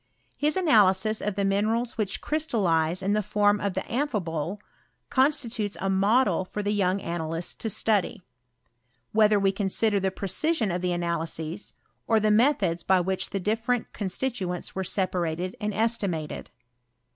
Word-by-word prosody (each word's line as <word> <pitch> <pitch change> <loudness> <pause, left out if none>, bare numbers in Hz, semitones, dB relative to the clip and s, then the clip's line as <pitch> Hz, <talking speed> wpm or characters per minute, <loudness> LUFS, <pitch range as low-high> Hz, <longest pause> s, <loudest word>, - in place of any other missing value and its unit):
His 300 +3 0
analysis 215 - +3
of 210 -2 -2
the 200 0 0
minerals 220 +5 0
which 210 -4 -2
crystallize 185 - +1
in 200 +2 +1
the 210 - +2
form 205 0 +2
of 200 -2 -2
the - - 0
amphibole, 200 - -2 0.5
con 265 +2 +5
stitutes 230 -8 -3
a 195 - 0
model 195 0 +3
for 210 +3 -5
the 205 +1 0
young 195 -1 +1
analysts 165 -1 -3
to 225 - -4
study, 205 -3 0 0.9
whether 210 -1 +4
we 195 -1 +3
consider 200 +1 +1
the 190 0 0
precision 215 - -1
of 175 +1 -2
the 180 0 0
analyses, 170 +1 -3 0.3
or 225 -1 +4
the 215 0 +2
methods 210 - +2
by 190 +1 +3
which 185 +1 -1
tlie 195 -2 -3
different 225 +4 -1
constituents 190 -3 -3
were 190 - -2
separated 180 -2 -1
and 210 0 -1
estimated. 200 -8 -2
200 Hz, 150 wpm, -26 LUFS, 180-220 Hz, 0.9 s, con